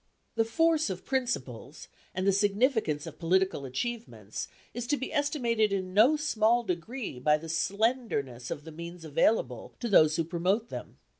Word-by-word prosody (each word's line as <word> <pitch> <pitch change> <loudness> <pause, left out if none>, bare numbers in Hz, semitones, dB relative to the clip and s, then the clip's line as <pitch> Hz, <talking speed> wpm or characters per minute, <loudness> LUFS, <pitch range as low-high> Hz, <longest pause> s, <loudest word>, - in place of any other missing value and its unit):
The 225 0 +2
force 320 +3 +2
of 185 -1 -5
principles, 145 - -3 0.3
and 185 +1 -1
the 195 - +5
significance 205 - +1
of - - -9
political 180 -3 +1
achievements, 130 - -4 0.3
is 240 0 -4
to 290 - +1
be 265 - -5
estimated 235 -7 +1
in 185 -2 -2
no 230 +10 +6
small 240 -6 +2
degree 195 - -4
by 150 +4 +3
the 165 +2 -9
slenderness 170 - -1
of 145 - -5
the 160 - -9
means 170 +1 -8
available 140 - 0
to 240 - -2
those 155 -7 +5
who 165 - +1
promote 185 +7 0
them. - - -8
195 Hz, 160 wpm, -29 LUFS, 160-235 Hz, 0.3 s, no